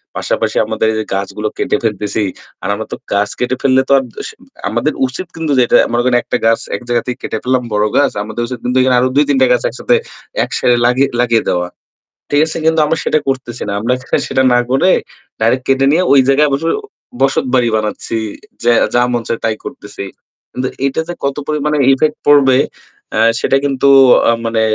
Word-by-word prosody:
পাশাপাশি -, -, -1 dB
আমাদের 110 Hz, -, -1 dB
এই -, -, -3 dB, 0.2 s
গাছগুলো 100 Hz, +2 st, -3 dB
কেটে -, -, 0 dB
ফেলতেছি। 105 Hz, -1 st, -1 dB, 0.4 s
আর -, -, -3 dB
আমরা 110 Hz, +2 st, -4 dB
তো -, -, -3 dB, 0.2 s
গাছ 100 Hz, +1 st, +1 dB
কেটে 125 Hz, +1 st, 0 dB
ফেললে 130 Hz, -1 st, +3 dB
তো -, -, +1 dB
আর -, -, -4 dB
দ -, -, -26 dB
স -, -, -7 dB, 0.4 s
আমাদের 120 Hz, +8 st, -1 dB
উচিত 175 Hz, +8 st, -7 dB
কিন্তু 160 Hz, -2 st, -3 dB
যেটা 120 Hz, -, +2 dB, 0.2 s
মনে 120 Hz, 0 st, +1 dB
করেন 125 Hz, -1 st, +3 dB
১ -, -, -1 dB
গাছ 115 Hz, 0 st, +3 dB, 0.2 s
এক 100 Hz, -, -6 dB
জায়গা 120 Hz, -1 st, +1 dB
থেকে 125 Hz, 0 st, -4 dB
কেটে -, -, -3 dB
ফেললাম 130 Hz, 0 st, +1 dB
বড় 105 Hz, +1 st, +2 dB
গাছ। -, -, +3 dB
আমাদের 110 Hz, +2 st, -5 dB
উচিত 125 Hz, -1 st, -6 dB
কিন্তু 125 Hz, +1 st, 0 dB
এখানে 130 Hz, -1 st, +3 dB
আরও 130 Hz, +1 st, +2 dB
২-৩ 150 Hz, -, +3 dB
টা -, -, +6 dB
গাছ -, -, 0 dB
একসাথে, -, -, 0 dB, 0.6 s
একসাথে 120 Hz, -1 st, +3 dB
লাগিয়ে 130 Hz, +3 st, +2 dB
লাগিয়ে 115 Hz, -2 st, +2 dB
দেওয়া। 90 Hz, 0 st, 0 dB, 0.6 s
ঠিক 145 Hz, 0 st, +3 dB
আছে? 160 Hz, -, -5 dB
কিন্তু 160 Hz, 0 st, +3 dB
আমরা 160 Hz, +2 st, 0 dB
সেটা 155 Hz, -, +2 dB
করতেছি 130 Hz, -3 st, -3 dB
না। -, -, -2 dB
আমরা 120 Hz, +4 st, 0 dB, 0.2 s
খালি -, -, +1 dB
সেটা 130 Hz, 0 st, +1 dB
না 120 Hz, -, +4 dB
করে 175 Hz, +8 st, +3 dB, 0.5 s
ডাইরেক্ট 125 Hz, +3 st, +1 dB
কেটে 135 Hz, 0 st, +2 dB
নিয়ে 175 Hz, -, +3 dB
ওই 140 Hz, -, +7 dB
জায়গায় 145 Hz, +2 st, +4 dB
বস 140 Hz, +3 st, -1 dB, 0.6 s
বসতবাড়ি 130 Hz, -2 st, +2 dB
বানাচ্ছি। 110 Hz, +1 st, -3 dB, 0.5 s
যে 120 Hz, -, +4 dB, 0.2 s
যা 120 Hz, -, +4 dB
মন 120 Hz, -, -1 dB
চাই 115 Hz, -, -1 dB
তাই 110 Hz, -1 st, +1 dB
করতেছি। 100 Hz, -, -8 dB, 0.5 s
কিন্তু 130 Hz, 0 st, -2 dB, 0.2 s
এটা 140 Hz, +3 st, -1 dB
যে 175 Hz, -, -4 dB
কত 140 Hz, 0 st, -1 dB
পরিমাণে 150 Hz, 0 st, 0 dB, 0.2 s
ইফেক্ট 150 Hz, +3 st, +1 dB
পড়বে 135 Hz, -3 st, +5 dB, 0.6 s
এ -, -, +1 dB, 0.2 s
সেটা 135 Hz, -, +2 dB
কিন্তু 140 Hz, -1 st, +1 dB, 0.4 s
আ -, -, +3 dB
মানে 115 Hz, -1 st, 0 dB
125 Hz, 200 wpm, -15 LUFS, 115-140 Hz, 0.6 s, ওই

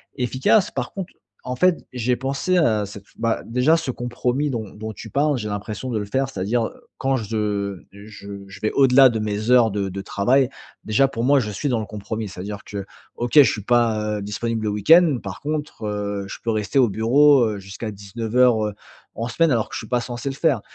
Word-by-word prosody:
efficace. 130 Hz, -, +2 dB
Par -, -, -4 dB
contre, 190 Hz, -2 st, -6 dB, 0.3 s
en 125 Hz, -, -3 dB
fait, 180 Hz, +6 st, +3 dB
j'ai 125 Hz, 0 st, 0 dB
pensé 135 Hz, +8 st, 0 dB
à 110 Hz, -11 st, +2 dB
cette 100 Hz, 0 st, -11 dB
bah 115 Hz, -1 st, 0 dB
déjà, 125 Hz, +8 st, +3 dB
ce 160 Hz, -5 st, -3 dB
compromis 125 Hz, +4 st, -2 dB
dont 110 Hz, -6 st, -4 dB
dont 110 Hz, +1 st, -6 dB
tu 110 Hz, +2 st, -10 dB
parles, 145 Hz, +2 st, +1 dB
j'ai 105 Hz, -, -4 dB
l'impression 105 Hz, +4 st, -5 dB
de 115 Hz, -, -1 dB
le 105 Hz, -, -2 dB
faire. 135 Hz, +6 st, 0 dB
C'est-à-dire, 115 Hz, +1 st, -1 dB
heu, -, -, -15 dB, 0.2 s
quand 135 Hz, 0 st, 0 dB
je 105 Hz, -4 st, -2 dB
je 100 Hz, -1 st, -10 dB
je 100 Hz, 0 st, -12 dB
vais 110 Hz, -, -1 dB
au-delà 135 Hz, 0 st, +6 dB
de 115 Hz, -3 st, -1 dB
mes 105 Hz, +1 st, -2 dB
heures 120 Hz, -3 st, +5 dB
de 100 Hz, -1 st, -2 dB
de 95 Hz, +1 st, -5 dB
travail, 125 Hz, +7 st, +2 dB, 0.3 s
déjà, 110 Hz, +6 st, +3 dB
pour 130 Hz, -4 st, -4 dB
moi, 140 Hz, +2 st, +4 dB
je 110 Hz, -5 st, -2 dB
suis 105 Hz, +8 st, -3 dB
dans 120 Hz, -3 st, +1 dB
le 110 Hz, -, -4 dB
compromis. 105 Hz, +1 st, -5 dB
C'est-à-dire 100 Hz, +2 st, -7 dB
que, 100 Hz, -1 st, -6 dB, 0.3 s
OK, 120 Hz, 0 st, -3 dB
je 145 Hz, -3 st, +8 dB
suis 105 Hz, -, -4 dB
pas, 110 Hz, -2 st, +1 dB
heu, -, -, -5 dB
disponible 110 Hz, +3 st, -3 dB
le 105 Hz, -, 0 dB
week-end. 150 Hz, -, +5 dB
Par 95 Hz, -2 st, -6 dB
contre, 150 Hz, -4 st, -4 dB
heu, 100 Hz, -1 st, -3 dB
je -, -, -7 dB
peux 115 Hz, -, 0 dB
rester 110 Hz, +4 st, -1 dB
au 125 Hz, -4 st, +5 dB
bureau, 130 Hz, +5 st, +5 dB
heu, -, -, -7 dB
jusqu'à 100 Hz, +3 st, -7 dB
19:00, 110 Hz, +3 st, +1 dB
heu, 105 Hz, -, -5 dB, 0.4 s
en 115 Hz, +2 st, -3 dB
semaine, 165 Hz, +7 st, +2 dB
alors 115 Hz, -5 st, +1 dB
que -, -, -7 dB
je -, -, -3 dB
suis -, -, -8 dB
pas 125 Hz, -1 st, 0 dB
censé 120 Hz, +2 st, -6 dB
le 135 Hz, -, -5 dB
faire. 140 Hz, -7 st, +1 dB
115 Hz, 220 wpm, -22 LUFS, 105-130 Hz, 0.4 s, je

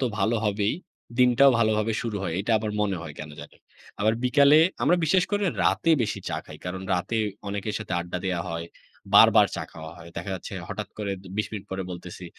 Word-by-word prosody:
তো -, -, +1 dB
ভালো 110 Hz, +4 st, +2 dB
হবেই, 105 Hz, +2 st, +1 dB, 0.4 s
দিনটাও 125 Hz, +2 st, +6 dB
ভালোভাবে 110 Hz, -1 st, +2 dB
শুরু 115 Hz, -3 st, -3 dB
হয়, 90 Hz, -4 st, -2 dB
এটা 110 Hz, -, -3 dB
আবার 110 Hz, 0 st, -3 dB
মনে 100 Hz, -2 st, 0 dB
হয় 75 Hz, -3 st, -7 dB
কেন 75 Hz, -1 st, -7 dB
জানি। -, -, -12 dB, 0.4 s
আবার 110 Hz, +2 st, +3 dB
বিকালে, 140 Hz, +3 st, +6 dB, 0.2 s
আমরা 180 Hz, -, +4 dB
বিশেষ 180 Hz, +4 st, +3 dB
করে 205 Hz, 0 st, +1 dB, 0.2 s
রাতে 165 Hz, -, +2 dB
বেশি 110 Hz, -, -2 dB
চা -, -, -2 dB
খাই। -, -, -11 dB
কারণ 90 Hz, +1 st, -4 dB
রাতে 90 Hz, +6 st, -2 dB, 0.3 s
অনেকের 100 Hz, +1 st, -3 dB
সাথে -, -, -7 dB
আড্ডা 90 Hz, +1 st, -5 dB
দেয়া 90 Hz, -2 st, -1 dB
হয়, 85 Hz, 0 st, -4 dB, 0.5 s
বারবার -, -, +8 dB
চা -, -, -3 dB
খাওয়া 80 Hz, 0 st, -9 dB
হয়। 85 Hz, -, -11 dB
দেখা 85 Hz, +3 st, -4 dB
যাচ্ছে 90 Hz, -, -8 dB, 0.2 s
হঠাৎ -, -, -5 dB
করে 100 Hz, -2 st, -2 dB, 0.2 s
২০ 105 Hz, -, 0 dB
মিনিট 105 Hz, -3 st, -5 dB
পরে 95 Hz, 0 st, -3 dB
বলতেছি, 90 Hz, +1 st, -8 dB
105 Hz, 200 wpm, -26 LUFS, 90-115 Hz, 0.5 s, বারবার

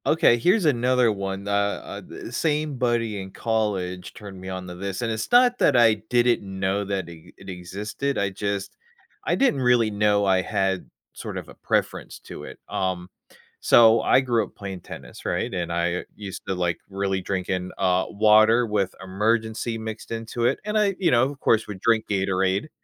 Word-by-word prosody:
Okay, 155 Hz, -7 st, +4 dB
here's 185 Hz, -, +3 dB
another 125 Hz, -3 st, +3 dB
one, 100 Hz, 0 st, -4 dB
uh, -, -, -1 dB, 0.3 s
uh -, -, -8 dB
d -, -, -10 dB
same 150 Hz, -2 st, -1 dB
buddy 115 Hz, -4 st, 0 dB
in 95 Hz, -, -8 dB
college 95 Hz, -5 st, -2 dB
turned 100 Hz, -3 st, -10 dB
me 95 Hz, -, -7 dB
on 95 Hz, -1 st, -5 dB
to 90 Hz, -, -7 dB
this, 95 Hz, +4 st, -4 dB
and 115 Hz, -, -1 dB
it's 110 Hz, 0 st, -4 dB
not 245 Hz, 0 st, +5 dB
that -, -, +4 dB
I 115 Hz, -2 st, +6 dB, 0.2 s
didn't 120 Hz, 0 st, +3 dB, 0.2 s
know 95 Hz, +2 st, 0 dB
that 95 Hz, -3 st, -3 dB
it 85 Hz, -2 st, -13 dB
it 95 Hz, -, -12 dB
existed, 100 Hz, +9 st, -4 dB
I 100 Hz, -1 st, 0 dB
just 100 Hz, 0 st, -3 dB, 0.5 s
I -, -, +1 dB
didn't 255 Hz, -, +2 dB
really 120 Hz, -3 st, +3 dB
know 105 Hz, 0 st, +2 dB
I 95 Hz, -1 st, +3 dB
had 95 Hz, 0 st, -1 dB, 0.2 s
sort -, -, -7 dB
of -, -, -7 dB
a -, -, -11 dB
preference -, -, -2 dB
to -, -, -9 dB
it. -, -, -10 dB
Um, 90 Hz, -1 st, -2 dB, 0.5 s
so 115 Hz, -1 st, +6 dB
I -, -, +4 dB
grew 120 Hz, -4 st, +1 dB
up -, -, -11 dB
playing 95 Hz, -3 st, -7 dB
tennis, -, -, -11 dB
right? -, -, -2 dB
And 85 Hz, -1 st, -3 dB
I 85 Hz, +1 st, -1 dB
used 100 Hz, -3 st, -7 dB
to, 95 Hz, -, -1 dB
like, 90 Hz, -1 st, -1 dB
really 95 Hz, -1 st, -1 dB
drink 95 Hz, -1 st, -3 dB
in, 90 Hz, 0 st, -2 dB
uh, 95 Hz, -1 st, +2 dB
water 110 Hz, +3 st, +5 dB
with 100 Hz, -4 st, -1 dB
Emergen-C 110 Hz, +4 st, -1 dB
mixed 110 Hz, 0 st, -7 dB
into 115 Hz, +1 st, -3 dB
it, -, -, +1 dB
and 210 Hz, 0 st, +1 dB
I 200 Hz, -2 st, +2 dB
you 175 Hz, -4 st, +2 dB
know, 120 Hz, 0 st, +4 dB
of 140 Hz, -, -12 dB
course, 110 Hz, -3 st, +2 dB
would 100 Hz, -2 st, -7 dB
drink 115 Hz, -1 st, +2 dB
Gatorade. 95 Hz, +4 st, 0 dB
105 Hz, 190 wpm, -24 LUFS, 95-120 Hz, 0.5 s, I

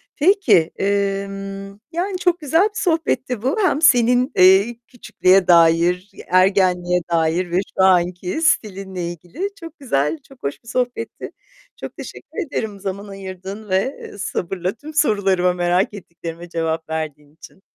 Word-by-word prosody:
Peki, 330 Hz, -, +3 dB
emm, 195 Hz, 0 st, -3 dB
yani, 365 Hz, +3 st, -2 dB
çok 355 Hz, -1 st, +1 dB
güzel 320 Hz, +4 st, +2 dB
bir 425 Hz, +1 st, -1 dB
sohbetti 270 Hz, -, 0 dB
bu, 265 Hz, -, 0 dB
hem 360 Hz, -6 st, +1 dB
senin, 250 Hz, -2 st, +4 dB
eee, 190 Hz, +5 st, +5 dB
küçüklüğe 190 Hz, -6 st, +2 dB
dair, 170 Hz, +2 st, +4 dB, 0.2 s
ergenliğe 180 Hz, -1 st, +3 dB
dair 170 Hz, +2 st, +1 dB
ve 175 Hz, -, +2 dB, 0.2 s
şu 190 Hz, -, +4 dB
anki 180 Hz, -, +2 dB
stilinle 190 Hz, -, 0 dB
ilgili 180 Hz, -, -6 dB
çok 330 Hz, -2 st, -11 dB
güzel, 150 Hz, -, 0 dB
çok 270 Hz, -2 st, -19 dB
hoş 140 Hz, 0 st, -4 dB
bir -, -, -22 dB
sohbetti. 245 Hz, 0 st, -3 dB, 0.5 s
Çok -, -, -8 dB
teşekkür 405 Hz, -6 st, -7 dB
ederim 220 Hz, -7 st, -4 dB
zaman 200 Hz, +1 st, -5 dB
ayırdığın 195 Hz, +1 st, -8 dB
ve 190 Hz, +8 st, -2 dB
sabırla 185 Hz, -2 st, -3 dB
tüm 300 Hz, +7 st, -11 dB
sorularıma, 195 Hz, -, +2 dB
merak 180 Hz, +3 st, +1 dB
ettiklerime 170 Hz, -3 st, -9 dB
cevap 165 Hz, -1 st, -2 dB
verdiğin 150 Hz, -2 st, -5 dB
için. 185 Hz, -, -15 dB
195 Hz, 135 wpm, -20 LUFS, 180-250 Hz, 0.5 s, eee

